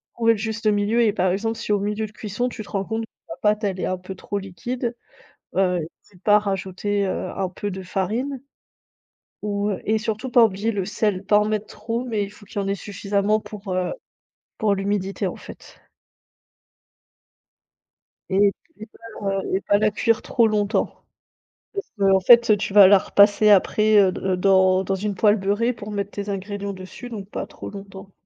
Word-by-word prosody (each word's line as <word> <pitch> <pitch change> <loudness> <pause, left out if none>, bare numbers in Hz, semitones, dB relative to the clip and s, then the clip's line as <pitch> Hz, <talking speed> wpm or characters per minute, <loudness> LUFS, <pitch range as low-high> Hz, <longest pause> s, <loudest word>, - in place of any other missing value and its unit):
trouver 230 -1 +3
le 220 - -4
juste 220 +1 -3
milieu 210 +3 +2
et 215 -3 +3
par 185 -3 +1
exemple, 225 +4 -2
si 225 - -4
au 205 - +3
milieu 210 +2 -2
de 210 - -10
cuisson, 215 +3 -3
tu 235 - -8
te 210 - -11
rends 195 -1 -1
compte 225 +2 -3
que - - -43 0.2
la 165 - -5
pâte, 210 +1 +2
elle 190 -2 -1
est - - -1
un 185 - -1
peu 185 +1 -9
trop 205 +2 -5
liquide, 235 +6 -4 0.6
heu, 180 -2 +2
n'hésite 180 +4 -11
pas 210 - +5
à - - +6
rajouter, 200 0 -2
heu, 190 - -3
un 190 -1 -1
peu 205 +3 -5
de 190 -1 -6
farine 225 +9 -2 1.0
ou 205 0 -1
heu 190 - -4
et 220 +1 +1
surtout 220 +3 -3
pas 240 -1 +6
oublier 210 +2 -1
le 200 -4 -2
sel, 205 -1 -1
pas 210 +1 +5
en 210 - +1
mettre 215 0 -1
trop 230 +3 -4
mais 220 -4 -1
il 200 - -6
faut 205 0 -16
qu'il 200 - -4
y - - -2
en 195 - -4
ait 195 - 0
suffisamment 200 +1 -1
pour, 205 -3 -7
heu, 185 0 -1 0.7
pour 210 -2 +2
l'humidité, 195 0 -2
en - - -2
fait. - - -13 2.5
Et 200 +1 +4 0.3
et 215 - -7
pas 225 -2 -9
la 195 0 0
et 190 - +1
pas 205 - +2
la 215 0 +2
cuire 230 +2 +1
trop 230 -2 +3
longtemps 210 0 0 0.8
parce 400 - -5
qu'en 195 -1 +4
fait, 235 +1 +6
tu 195 - -4
vas 200 -2 +9
la 200 +1 +7
repasser 205 +2 +4
après, 210 +2 +4
heu, 190 -2 +5
d 185 0 -2
dans 190 0 +4
dans 195 +1 -1
une 205 +1 -3
poêle 210 +3 +4
beurrée 205 +5 0
pour 215 -2 -9
mettre 200 0 -3
tes 205 0 -5
ingrédients 200 0 -4
dessus, 190 +6 -10
donc 205 -5 -7
pas - - -5
trop - - -9
longtemps. 195 -1 -10
205 Hz, 200 wpm, -23 LUFS, 195-215 Hz, 2.5 s, vas